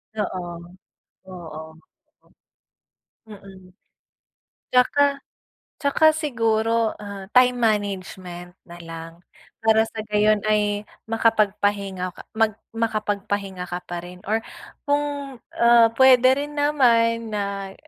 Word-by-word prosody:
Oo, 185 -4 -3 0.8
oo. 160 -3 -9 1.5
Mm. 190 -3 -14 1.0
'Tsaka 280 +2 +3 0.6
'tsaka 285 +2 +1
siguro 230 -6 0
ah, 200 -2 -9
time 250 0 +5
management 190 -5 -2
nalang 165 -1 -10 0.4
para 220 -1 +4
sa 225 0 -7
gayon 210 0 +3
ay 210 -1 0 0.2
makapagpahinga 205 -4 0
ka - - -11
mag 220 -1 +1 0.2
makapagpahinga 205 -4 -3
ka 175 0 -5
pa 175 - -6
rin 180 0 -12
or 220 - +3 0.5
kung, 285 -2 -2 0.2
ah, 235 -1 +6
puwede 260 0 +6
rin 290 +1 -5
naman 230 -6 +2
na, 200 -1 -4
215 Hz, 95 wpm, -23 LUFS, 190-235 Hz, 1.5 s, ah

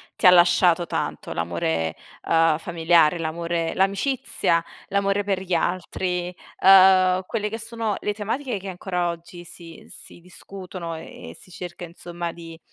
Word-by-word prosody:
ti - - +4
ha - - +11
lasciato 175 -1 +5
tanto. - - -4
L'amore, 80 -1 -2 0.3
ehm, 165 -1 +3
familiare, 165 -1 +3
l'amore 165 +1 -2
l'amicizia, 195 -4 0 0.3
l'amore 200 0 +1
per 195 -2 -1
gli 185 -2 -1
altri, 180 +1 -2 0.3
ehm, 185 -1 +6
quelle 210 0 -2
che 225 - -5
sono 225 -2 -3
le 210 - -2
tematiche 225 +2 -3
che 195 +1 -7
ancora 180 -1 -2
oggi 175 +1 -8
si 170 -1 -12
si - - -10
discutono 180 -1 -8
e 160 - -10
e 85 - -11
si - - -16
cerca 180 0 -8
insomma 170 0 -6
di 165 -1 -11
175 Hz, 145 wpm, -23 LUFS, 170-195 Hz, 0.3 s, ha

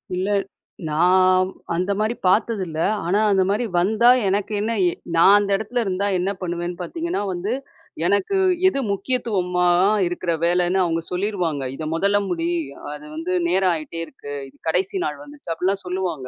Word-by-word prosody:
இல்ல. 185 +2 -1 0.6
நான் 185 +3 +4 0.3
அந்த 185 +3 0
மாரி 220 +2 0
பார்த்ததில்ல. 185 -5 +1 0.3
ஆனா 195 +5 +2
அந்த 190 -1 +3
மாரி 215 +4 0
வந்தா, 220 +6 +4 0.2
எனக்கு 200 +2 0
என்ன 225 +2 -1 0.2
எ - - -1 0.2
நான் 190 +5 +7
அந்த 205 -1 -2
இடத்துல 235 +3 -2
இருந்தா 190 +1 -1
என்ன 190 +3 0
பண்ணுவேன்னு 175 0 -3
பார்த்தீங்கன்னா 330 - -3
வந்து, 180 +4 -3 0.5
எனக்கு 200 - +1 0.3
எது 275 - +1
முக்கியத்துவமா 190 -6 0 0.4
இருக்குற 175 0 -2
வேலன்னு 180 +2 +2
அவங்க 165 -1 0
சொல்லிருவாங்க. 180 -6 -1
"இத 155 - -6
மொதல்ல 200 +4 +2
முடி. 170 -1 -1 0.4
அது 150 0 -10
வந்து 165 +3 -3 0.2
நேரம் 185 0 +3
ஆயிட்டே 165 +1 -5
இருக்கு. 145 - -10
இது - - -19
கடைசி 185 - 0
நாள் - - -4
வந்துருச்சு." 290 - -9
அப்படிலாம் 190 +4 -1
சொல்லுவாங்க. 180 -7 -3
185 Hz, 150 wpm, -22 LUFS, 175-205 Hz, 0.6 s, நான்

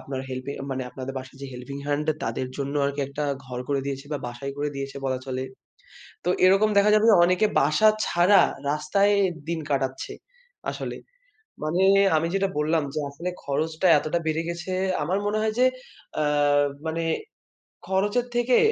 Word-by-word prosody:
আপনার 135 -1 -5
হেল্পে 130 +2 -5 0.2
মানে, 130 -1 -2
আপনাদের 130 +1 -6
বাসায় 130 +1 -11
যে - - -4
হেল্পিং 125 +3 -7
হ্যান্ড 145 +1 -1 0.2
তাদের 115 +3 -2
জন্য 140 0 -3
আরকি 140 +1 -1
একটা 145 +2 -3 0.2
ঘর 125 -1 -6
করে 140 -1 +1
দিয়েছে 140 0 -4
বা 145 - -1
বাসাই 120 +3 -5
করে 145 +1 0
দিয়েছে 140 0 -5
বলা 130 -1 0
চলে। 130 -1 -3 0.8
তো - - -1 0.2
এরকম 195 +3 +5
দেখা 205 +1 +5
যাবে 215 0 +4
যে, - - +7
অনেকে 185 +4 +3
বাসা 155 +10 +4 0.2
ছাড়া, 180 +3 +5 0.3
রাস্তায় 195 +7 +2 0.4
দিন 170 -1 -1
কাটাচ্ছে। 135 -1 -1 0.6
আসলে - - -5 0.7
মানে, 170 +5 +1 0.3
আমি 160 +2 0
যেটা 195 0 +1
বললাম 155 +1 +1
যে, 155 - -1
আসলে 165 +6 -5
খরচটা 155 +5 0
এতটা 155 +4 -1
বেড়ে 160 +1 +1
গেছে, 175 +2 -5 0.3
আমার 180 +6 0
মনে 210 +1 0
হয় 220 0 0
যে, 255 - +6 0.6
আ - - +2 0.6
মানে 165 +1 -2 0.8
খরচের 205 +6 +1
থেকে 240 +1 +3
150 Hz, 165 wpm, -25 LUFS, 135-185 Hz, 0.8 s, যে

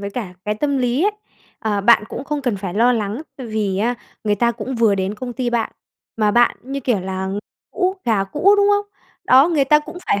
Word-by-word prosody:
với 200 0 -5
cả 200 -6 -5
cái 210 0 -1
tâm 280 +4 0
lý 250 +3 +1
ấy, 420 - +4 0.5
ờ, 210 -3 -1
bạn 215 +1 +5
cũng - - -6
không 290 0 -3
cần 240 -6 0
phải 190 -2 -5
lo 240 +3 +4
lắng 220 +4 -2
tại 255 -3 -7
vì 210 -3 -1
á 235 +4 +1 0.3
người 210 -1 +2
ta 235 +3 +1
cũng 240 +3 -5
vừa 225 -3 +3
đến 190 +1 -2
công 245 +2 -6
ty 245 -1 -2
bạn, 235 -1 -1 0.4
mà 215 -2 +2
bạn 240 +2 +3
như 275 +2 -5
kiểu 240 -6 0
là 190 +1 -4 0.4
cũ, 375 0 0
gà 215 -4 +2
cũ, 335 - +3
đúng 405 0 +4
không? 410 0 +1 0.4
Đó, 270 +6 +6
người 300 -5 +2
ta 300 +3 +5
cũng 300 +4 -9
phải 200 - +1
235 Hz, 235 wpm, -20 LUFS, 205-270 Hz, 0.5 s, Đó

